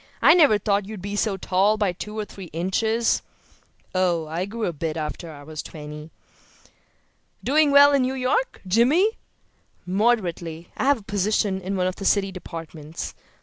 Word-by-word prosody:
I - - +7
never 295 -11 +6
thought 200 -1 0
you 215 0 -7
were 200 +2 -5
so 205 -1 0
tall 195 +3 +2
by 205 -3 +1
two 210 +4 -7
or 215 - -2
three 195 -2 -10
inches." 220 +7 +1 0.7
"Oh, 175 -3 +1
I 165 +4 -3
grew 220 +2 -4
a 175 - -2
bit 160 +1 -3
after 160 +2 -5
I 145 -2 -11
was 155 0 -6
twenty." 150 0 -9 1.3
"Doing 300 +2 +4
well 285 0 +7
in 280 - +4
New 255 +1 0
York, 265 - 0
Jimmy?" 280 - +3 0.7
"Moderately. 180 -5 0
I - - -2
have 285 0 +4
a 220 - -14
position 205 -1 0
in 190 +2 -3
one 180 - +1
of 185 0 -2
the 195 - -6
city 195 -1 +2
departments. 165 -3 -7
195 Hz, 170 wpm, -24 LUFS, 170-230 Hz, 1.3 s, I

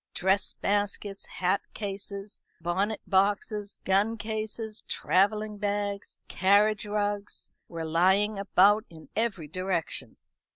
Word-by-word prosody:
Dress 190 +2 +2
baskets, 205 0 -1
hat 185 +2 0
cases, 200 0 -6 0.2
bonnet 190 +6 -1
boxes, 205 +1 +1
gun 205 +4 +2
cases, 220 0 -4
travelling 205 +5 +1
bags, 205 -1 -2
carriage 210 +2 +3
rugs, 205 -1 -2 0.2
were 165 -1 -5
lying 190 +6 +3
about 200 +2 +4
in 160 -2 -13
every 210 -8 -1
direction. 185 +1 -2
200 Hz, 100 wpm, -28 LUFS, 190-210 Hz, 0.2 s, about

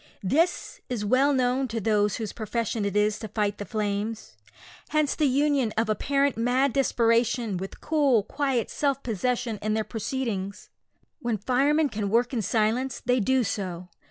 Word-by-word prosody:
This 325 - 0
is 230 -4 -2
well 260 +6 +3
known 260 0 +1
to 225 -1 -3
those 210 -1 +1
whose 220 -2 -4
profession 225 -1 -2
it 200 0 -2
is 210 0 +2
to 220 - -6
fight 205 -1 -1
the 205 - -4
flames. 210 - -3 0.5
Hence 305 -1 +1
the 305 - +2
union 275 -3 +2
of 225 0 +1
apparent 280 +5 +1
mad 250 +3 +2
desperation, 235 -4 +2
with 190 +2 -6
cool, 285 -8 +2
quiet 270 0 -1
self 275 -2 0
possession 235 0 -1
in 215 0 0
their 220 - 0
proceedings. 220 -4 -4 0.5
When 240 -6 -1
firemen 280 +8 +2
can 210 -3 -3
work 240 +4 +2
in 235 - 0
silence 230 +5 0
they 250 0 +3
do 260 +4 +2
so. 180 -4 -4
235 Hz, 160 wpm, -26 LUFS, 210-265 Hz, 0.5 s, well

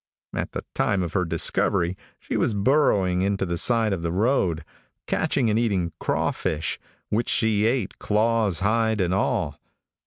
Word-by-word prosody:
At - - -3
the - - -5
time 100 -3 +1
of 85 -1 -5
her 90 -2 +1
discovery 85 +2 +1 0.2
she - - -5
was 110 - +1
burrowing 100 -6 +2
into 100 0 0
the 85 -1 -2
side 110 +3 +2
of 90 - -3
the 85 0 -2
road, 90 - +1 0.4
catching 130 -4 0
and 110 - +2
eating 95 -8 0
crawfish, 80 0 -1 0.3
which 115 +3 0
she 110 -1 +2
ate 115 -5 -1
claws, 110 -3 +1
hide 110 +1 +1
and 90 -1 +1
all. 95 - -1
100 Hz, 155 wpm, -24 LUFS, 90-115 Hz, 0.4 s, burrowing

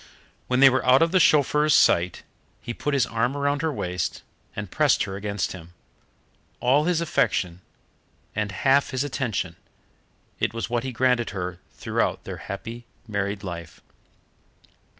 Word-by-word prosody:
When 125 +1 +1
they 135 - +10
were 130 - +1
out 130 +4 +5
of 165 - +1
the 185 - +4
chauffeur's 150 -1 +4
sight 85 +1 +3 0.4
he 120 - -6
put 145 +4 -2
his 130 -3 +3
arm 120 +3 -1
around 140 0 0
her 160 -1 0
waist 90 - -3 0.3
and - - -6
pressed - - +3
her 95 - -5
against 100 -1 -2
him. 85 -1 -11 0.8
All 135 +5 +3
his 175 -1 +1
affection 90 - 0 0.7
and 105 -1 -1
half 135 +8 +2
his 130 0 -1
attention 110 -11 -3 0.8
it - - -1
was 115 -2 -4
what 120 -1 0
he 130 - -3
granted 125 -1 +1
her 90 -1 -4 0.2
throughout - - -1
their - - -6
happy 115 +4 -7 0.2
married 100 -1 -2
life. 85 -3 -7
120 Hz, 150 wpm, -25 LUFS, 95-140 Hz, 0.8 s, they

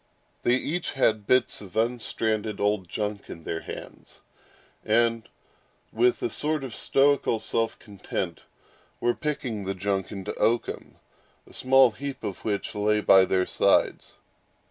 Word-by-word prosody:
They 120 - +3
each 165 +6 -2
had 110 -6 +1
bits 125 -2 +2
of 95 -3 -11
unstranded 110 -2 -1
old 100 -3 0
junk 105 0 -4
in 85 - -9
their 80 - -3
hands, - - -10 0.6
and, 115 0 +1 0.6
with 120 +2 +2
a - - +1
sort 150 -1 -1
of 130 -4 -6
stoical 140 -4 +2
self 115 +1 -1
content, 100 -3 -5 0.6
were 120 - +2
picking 125 -9 -3
the 95 +1 -2
junk 95 0 -2
into 100 -1 -5
oakum, 115 0 0 0.5
a - - -16
small 130 -1 +5
heap 140 +1 -7
of 95 - -5
which 105 -2 -2
lay 105 +1 +1
by 95 -2 +6
their 95 0 +1
sides. - - +1
110 Hz, 140 wpm, -26 LUFS, 100-125 Hz, 0.6 s, by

